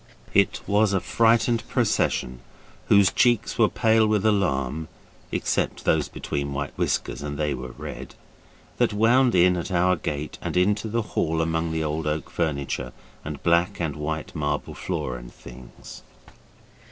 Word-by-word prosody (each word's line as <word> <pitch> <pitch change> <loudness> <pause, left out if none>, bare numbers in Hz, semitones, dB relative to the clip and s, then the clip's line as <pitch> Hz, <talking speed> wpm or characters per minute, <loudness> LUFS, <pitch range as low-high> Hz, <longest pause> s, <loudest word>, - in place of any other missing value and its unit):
It - - +3
was 105 0 +2
a 95 - +2
frightened 115 +2 +2
procession, 60 0 0 0.5
whose 100 -2 +5
cheeks 120 -2 +2
were 110 - +5
pale 110 -1 +3
with 105 -1 +1
alarm 80 -8 0 0.4
except - - -1
those 80 -2 +2
between 70 0 -4
white 70 +1 -4
whiskers, - - -1
and 75 0 -5
they 75 -2 0
were 65 -1 -7
red - - -8 0.6
that 120 -2 +2
wound 120 +3 +4
in 90 0 +5
at 85 +3 -4
our 90 +1 +3
gate 75 -2 -5
and - - -3
into 105 +4 +2
the 115 +1 -1
hall 80 0 0
among 80 0 0
the 80 0 -1
old 75 0 -2
oak 75 +1 -3
furniture, 70 -5 -2 0.3
and 75 -1 -7
black 85 +1 +2
and 80 -4 -2
white 75 +1 -4
marble 75 -1 -2
floor 65 -1 -4
and - - -11
things. - - -12
80 Hz, 155 wpm, -24 LUFS, 75-105 Hz, 0.6 s, whose